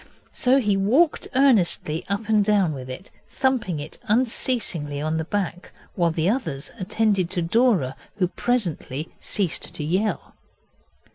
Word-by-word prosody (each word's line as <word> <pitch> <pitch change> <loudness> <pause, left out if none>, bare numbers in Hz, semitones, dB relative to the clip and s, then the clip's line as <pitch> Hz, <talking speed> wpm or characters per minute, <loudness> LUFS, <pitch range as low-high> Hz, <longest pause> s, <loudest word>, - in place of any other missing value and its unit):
So 255 +2 +3
he 210 -5 +1
walked 255 - +2
earnestly 205 - +3
up 200 +2 -1
and 215 -2 +4
down 200 -6 +2
with 130 -2 -7
it, 155 +10 -8 0.2
thumping 255 - 0
it 150 +2 -8
unceasingly 215 - 0
on 155 +2 -1
the 160 - -1
back, 180 -1 -3 0.2
while 170 -2 +2
the 160 +1 0
others 170 - -2
attended 200 -2 +1
to 180 -2 -1
Dora, 185 - +2 0.2
who 185 -3 +1
presently 170 - -2
ceased 190 -5 -1
to 160 - -3
yell. 190 +8 -1
195 Hz, 140 wpm, -24 LUFS, 160-225 Hz, 0.2 s, and